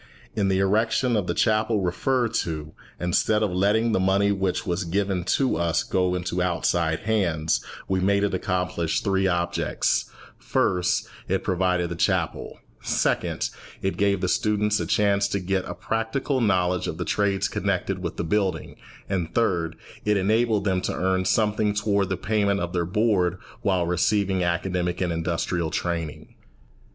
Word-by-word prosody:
In 100 -2 +1
the 95 -1 +2
erection 110 +5 +2
of 100 -4 0
the - - -1
chapel 110 -1 +2
referred 115 +6 0
to, 80 -2 -3 0.3
instead 105 +5 +1
of 105 - 0
letting 105 +5 +2
the 110 - +2
money 100 +2 +3
which 95 +1 -1
was 90 0 -1
given 95 +1 -1
to 130 +7 +1
us 85 -1 +1
go 90 -1 0
into 90 0 -2
outside 85 -2 0
hands, 85 -8 0 0.2
we 95 -1 +1
made 100 +2 +2
it 100 - 0
accomplish 90 -3 -1
three 95 -1 +1
objects: 85 -3 0 0.3
first, 90 0 +1 0.2
it 95 +1 0
provided 90 -2 +1
the - - -3
chapel; - - -1 0.2
second, - - 0 0.3
it 95 - 0
gave 100 -2 +1
the 95 - 0
students 105 +2 +1
a - - -2
chance 100 -1 +2
to 100 - -1
get 95 0 -1
a 90 - -5
practical 115 +8 -1
knowledge 90 -4 +1
of 80 - -4
the 85 - -3
trades 100 -2 +1
connected - - -1
with - - -4
the - - -1
building; 95 +2 -1 0.3
and, 90 -4 -2
third, 85 -8 +1 0.3
it 105 -1 +2
enabled 110 +2 +2
them 95 -2 +1
to - - -2
earn 95 0 0
something 105 0 +1
toward 100 -2 +1
the 95 - -1
payment 100 0 +1
of 90 -1 -3
their 85 -2 0
board 95 -2 +1 0.2
while 95 -3 +1
receiving 95 +2 +1
academic 90 0 -1
and 90 -2 0
industrial 85 0 -1
training. 85 -1 -4
95 Hz, 160 wpm, -25 LUFS, 90-105 Hz, 0.3 s, money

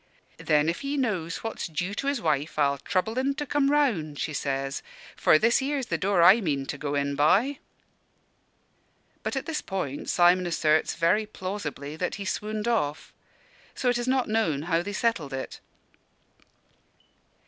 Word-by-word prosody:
'Then, 150 0 +2
if 170 - -1
he 280 +1 -2
knows 190 - -2
what's 225 - -4
due 175 +4 -3
to 275 +6 -3
his 280 -2 0
wife, 155 -5 -1
I'll 140 -2 +2
trouble 200 - -1
en 275 +1 0
to 295 - -3
come 280 0 +1
round,' 220 - +1
she 155 - -3
says; 135 -1 -2 0.3
'for 155 - +5
this 230 +8 +3
here's 275 -1 -1
the - - +2
door 190 -3 +3
I 200 +7 +7
mean 140 -7 -1
to 140 - -5
go 145 0 -2
in 140 0 0
by.'" 200 - +3 1.6
But - - -3
at 270 - -2
this 320 -2 -3
point 145 -8 -4
Simon 175 +1 +4
asserts 155 -2 +1
very 210 +6 +2
plausibly 185 -8 -5
that 180 +2 -2
he 200 - -6
swooned 210 +3 -3
off; 155 -11 -1 0.6
so 250 - 0
it 245 0 +1
is 240 - -3
not 260 -1 +1
known 215 -10 0
how 165 0 +1
they 205 - -5
settled 205 - -1
it. 130 0 -5
185 Hz, 170 wpm, -26 LUFS, 150-235 Hz, 1.6 s, I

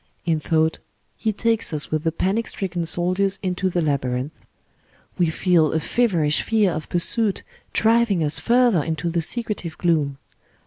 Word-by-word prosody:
In 165 -2 +1
thought, 160 +1 +1 0.4
he 220 - -1
takes 225 +1 +1
us 150 -1 -4
with 155 0 -1
the 165 - +1
panic 195 +7 -1
stricken 175 -3 -3
soldiers 185 +3 0
into 185 0 -1
the 175 -2 0
labyrinth. 130 -2 -1 0.9
We 175 -2 +3
feel 160 -2 +2
a 160 - +1
feverish 165 -6 +1
fear 215 -4 +2
of 155 -1 -5
pursuit 200 +4 -1 0.3
driving 225 -5 +3
us 150 0 +2
further 240 -8 +3
into 160 +1 -2
the 170 0 0
secretive 205 -3 -3
gloom. 150 -5 +1
175 Hz, 150 wpm, -22 LUFS, 155-205 Hz, 0.9 s, We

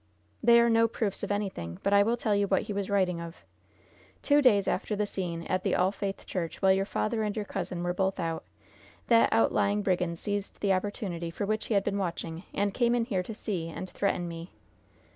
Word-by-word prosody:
"They 235 0 +7
are 235 - +5
no 230 0 +4
proofs 215 -3 -3
of 205 - -3
anything; 190 - -3
but 200 - +2
I 200 - +7
will 230 +4 +2
tell 220 -2 0
you 200 0 +2
what 190 -1 +2
he 210 - -5
was 200 0 -3
writing 185 -4 +1
of. 170 0 -7 0.9
Two 290 0 +4
days 205 -8 +4
after 210 +2 -1
the 210 +1 0
scene 175 -4 -4
at 185 +2 -1
the - - 0
All 185 +1 +3
Faith 200 -1 -5
Church, 170 -4 -4
while 190 -1 +4
your 195 +1 0
father 220 +1 -1
and 210 -1 -1
your 215 -2 -2
cousin 175 -2 -4
were 175 0 0
both 190 +1 0
out, 165 -2 -2 0.7
that 230 -1 +6
outlying 200 - +2
brigand 180 -3 0
seized 205 +2 -4
the 200 -2 +2
opportunity 185 -3 -3
for 185 +4 -3
which 215 +1 -1
he 220 - 0
had 200 - +3
been 200 - -1
watching, 170 -3 -3
and 200 0 0
came 240 -1 +2
in 235 -1 +1
here 200 -7 -1
to 210 +4 -7
see 185 -7 -3
and 185 +3 -6
threaten 185 -3 -1
me." 170 +1 -8
200 Hz, 220 wpm, -29 LUFS, 180-210 Hz, 0.9 s, They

